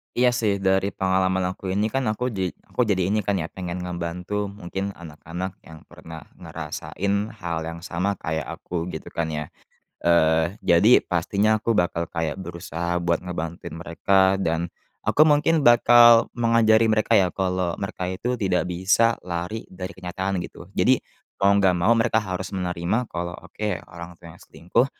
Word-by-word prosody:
Iya, 125 0 +4
sih, 105 -3 +2
dari 95 +1 +1
pengalaman 95 0 +1
aku 95 - -14
ini, 105 +2 0
kan, 135 -1 -1
aku 125 +4 -2
ja 95 -4 -1 0.2
aku - - 0
jadi 95 -3 +1
ini, 110 - +2
kan, 100 -1 -1
ya, 85 -3 -3
pengen 90 -1 -5
ngebantu, 90 +3 -3
mungkin 100 0 -5
anak-anak 85 +3 -7
yang 80 -1 -13
pernah 80 -1 -11 0.2
ngerasain 100 +3 -3
hal 85 -5 -4
yang 85 0 -7
sama 90 +4 -1
kayak 80 -3 -2
aku, 85 -1 -5
gitu, 80 - -8
kan, 85 -1 -2
ya. 75 -1 -3 0.6
Eee, 80 0 +3
jadi 100 +9 +5
pastinya 100 +5 +2
aku 115 +2 0
bakal 90 -4 0
kayak 80 -1 -3
berusaha 85 -1 -4
buat 85 0 0
ngebantuin 85 -1 -5
mereka 95 +4 +2
dan 85 -2 -1 0.3
aku 155 - +4
mungkin 155 0 +3
bakal 120 -1 +7
mengajari 115 -1 +4
mereka, 110 -1 +3
ya, 90 -2 +2
kalau 90 -2 -1
mereka 95 -2 -4
itu 125 +6 -2
tidak 95 -4 0
bisa 95 +6 +2
lari 90 +5 -4
dari 95 +1 -8
kenyataan, 95 +1 -3
gitu. - - -13
Jadi, - - +5 0.5
mau 100 +1 +5
nggak 95 -2 +4
mau 90 +4 +1
mereka 115 -1 +2
harus 95 -1 -5
menerima 90 +5 -1
kalau, 85 0 -4
oke 105 0 -5
orang 85 +1 -9
tuanya 85 -2 -12
selingkuh, 90 +9 0
95 Hz, 160 wpm, -24 LUFS, 85-105 Hz, 0.6 s, bakal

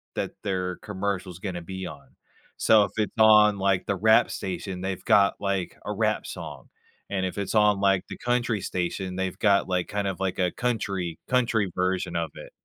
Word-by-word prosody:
that - - -2
their 90 -3 -2
commercial's 95 -3 -4
gonna 90 -3 -4
be 95 +2 -6
on. - - -12 0.4
So, 110 -2 +5
if 100 - -3
it's 105 -1 0
on, 105 -1 +6
like, 95 -1 +1
the 100 - +1
rap 110 +4 +4
station, 95 0 -5
they've 95 0 -4
got, 100 -1 +4
like, 100 -2 -2
a - - -2
rap - - 0
song, - - -8 0.4
and 95 -1 -1
if 95 - -4
it's 100 +2 -3
on, 105 -2 +4
like, 95 -2 +3
the - - -7
country 120 -3 0
station, 90 +1 -3
they've 95 -1 -3
got, 100 -2 +3
like, 90 -1 0
kind 100 -1 -2
of, 95 - -3
like, 95 -1 -2
a 90 -1 +2
country 100 -8 -2
country 115 -6 +1
version 90 -1 -1
of 85 -3 -2
it. - - -10
95 Hz, 190 wpm, -26 LUFS, 90-105 Hz, 0.4 s, on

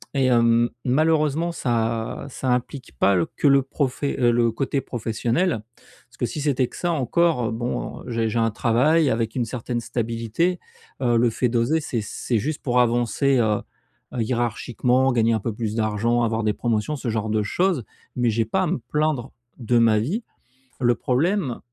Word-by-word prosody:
et 135 - +2
hem, 120 -1 +4 0.2
malheureusement 155 +4 +2
ça 115 -4 -2
ça 130 0 -4
implique 125 - -3
pas 100 - +4
le 85 -2 +1
que 145 - -1
le 140 0 +6
profe 135 0 -3
heu, 125 -4 +2
le 120 -1 +2
côté 135 +4 -1
professionnel, 120 - -1 0.5
parce - - -22
que - - 0
si 150 - -4
c'était 140 -3 +1
que - - -14
ça 175 - 0
encore, 155 -2 +1
heu, - - -2
bon 120 +2 -4
j'ai 115 -2 0
j'ai 115 - -1
un 115 0 +2
travail 135 +8 +3
avec 115 0 -1
une 125 -3 0
certaine 120 +1 -4
stabilité. 115 +10 -1 0.4
Heu, 120 -2 +2
le 120 +1 +3
fait 125 +3 0
d'oser, 120 +7 +1
c'est 120 -6 -2
c'est 110 +2 -2
juste 150 +7 -3
pour 125 -1 +3
avancer, 120 +3 +2
heu, 110 -3 +1 0.6
hiérarchiquement, 120 +2 +1
gagner 115 -1 +2
un 110 - +1
peu 110 +2 -3
plus 110 0 -3
d'argent, 115 +2 +1
avoir 115 -1 0
des 105 -1 +1
promotions, 115 +6 -1
ce 130 -4 -4
genre 110 -1 -2
de 105 0 +1
choses, 175 - 0 0.3
mais 120 -2 +2
j'ai 115 +1 0
pas 185 - 0
à - - 0
me 180 - -1
plaindre 150 -4 -1 0.3
de 120 0 +1
ma 115 -2 +4
vie. 175 - -2 0.6
Le 120 -1 +3
problème, 145 - 0
120 Hz, 180 wpm, -23 LUFS, 115-140 Hz, 0.6 s, le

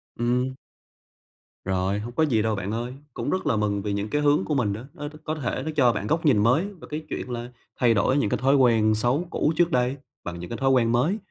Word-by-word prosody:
Ừm. 125 +2 0 1.1
Rồi, 95 +1 0
hông 120 +3 -6
có 160 - +2
gì 120 -8 +2
đâu 110 0 0
bạn 100 +1 -4
ơi, 120 +3 -3 0.2
cũng - - -3
rất 185 - -1
là - - +2
mừng 100 -1 0
vì 105 0 -2
những 100 +1 -2
cái 150 - 0
hướng 145 0 +3
của 150 - -1
mình 105 -7 +1
đó, 110 - -6
nó 145 -4 -6 0.2
có 155 0 -2
thể 130 -2 -3
nó 160 - -2
cho 125 -5 +5
bạn 105 0 -3
góc 160 +1 0
nhìn 135 -8 +5
mới 130 - +3
về 200 -5 -10
cái 155 +1 -4
chuyện - - -4
là 120 0 -4 0.3
thay 120 -3 +4
đổi 120 +6 +2
những 125 -8 +1
cái - - 0
thói 135 +2 +3
quen 110 -5 +4
xấu 125 +10 0
cũ 155 - +1
trước 175 +1 +2
đây 125 +2 +1 0.3
bằng 85 0 -6
những 90 - -7
cái 115 - -4
thói 135 0 +1
quen 120 -3 +3
mới. 145 - +2
125 Hz, 255 wpm, -25 LUFS, 110-145 Hz, 1.1 s, cho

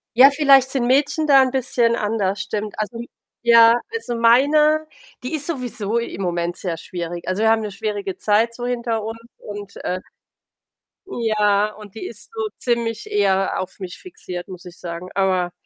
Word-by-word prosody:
Ja, 265 +4 +8
vielleicht 275 -3 +5
sind 245 -3 0
Mädchen 290 +4 +2
da 275 -2 +7
'n 260 - +2
bisschen 245 -3 +1
anders, 205 -3 -1
stimmt. 210 0 -4
Also 215 +2 -3 0.4
ja, 230 0 +6
also 450 - -3
meine, 295 +7 +4 0.4
die 255 - -4
ist 290 -1 -4
sowieso 245 - -3
i 235 - -5
im 195 - -6
Moment 175 -1 -2
sehr 175 -3 -3
schwierig. 175 0 -6
Also, 185 +4 -1
wir 220 - +5
haben 225 0 +3
'ne 210 -2 -4
schwierige 200 -1 -4
Zeit 220 +3 +2
so 245 +1 -6
hinter 235 -3 -2
uns 225 +1 -6 0.2
und, 205 -1 -9
äh 185 - -2 1.1
ja, 210 - +1
und 210 -1 -13
die 220 - -6
ist 210 -2 -9
so 220 -1 -2
ziemlich 235 -2 -2
eher 195 -2 +1
auf 185 - -6
mich 185 -3 -7
fixiert, 180 - -8
muss 180 -1 -10
ich 175 0 -11
sagen. 170 +1 -7
Aber 185 -2 +1
220 Hz, 175 wpm, -21 LUFS, 195-245 Hz, 1.1 s, Ja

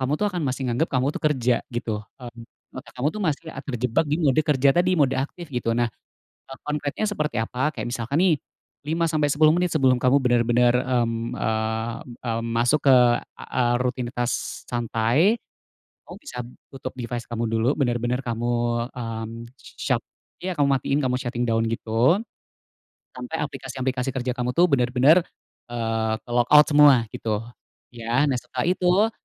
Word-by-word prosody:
kamu 130 +1 -1
tuh 210 - 0
akan 180 - -2
masih 130 +1 -3
menganggap 125 +6 0
kamu 130 +3 +1
tuh - - -6
kerja 125 -6 +2
gitu. 115 -3 -3 0.2
Mmm, 120 -2 -10 0.3
otak - - -11
kamu 130 +4 +1
tuh 215 - -6
masih, 160 -5 -1
eee, 135 - -8
terjebak 125 +2 0
di 150 - +1
mode 140 -1 +3
kerja 140 -3 +3
tadi, 175 +3 +2
mode 140 -4 +3
aktif 150 +4 -5
gitu. 115 -2 -1
Nah, 120 -1 +1 0.7
konkretnya 150 +3 -3
seperti 150 - -1
apa? 130 +6 -2
Kayak 115 -3 -4
misalkan 125 +5 -1
nih, 180 -4 +4 0.5
5 165 +2 0
sampai 155 -2 +1
10 155 +1 +5
menit 175 +1 +1
sebelum 130 -4 +4
kamu 130 +3 +3
benar-benar, 120 0 +3
mmm, 120 -2 -1
eee, 110 +1 -2 0.3
mmm, 115 -1 -2
masuk 120 +6 +1
ke, 135 -2 +8 0.4
eee, 120 -1 -1
rutinitas 125 -1 -3
santai, 120 - +1 0.6
kamu - - -11
bisa 275 - -7 0.2
tutup 130 -1 -7
device 120 0 -4
kamu 115 0 -1
dulu. 115 +2 +1
Benar-benar 120 -1 0
kamu, 120 +1 -1 0.4
mmm, 115 -2 -5 0.5
shut - - 0 0.4
ya 185 - -2
kamu 145 - +4
matikan, 135 +2 0
kamu 125 - 0
shutting 125 -1 -2
down 115 0 +1
gitu, 115 - +2 0.9
sampai 125 +6 -6
aplikasi-aplikasi 130 -2 -3
kerja 130 -1 -2
kamu 125 0 -1
tuh 175 0 +4
benar-benar, 135 +6 +4 0.4
eee, 115 -2 -1
ke-logout 125 +5 +5
semua 145 -1 +7 0.2
gitu, 110 -1 -3 0.5
ya. 120 +2 -1
Nah, 130 - 0
setelah 125 +2 -4
itu 185 +4 +3
125 Hz, 155 wpm, -24 LUFS, 120-145 Hz, 0.9 s, ke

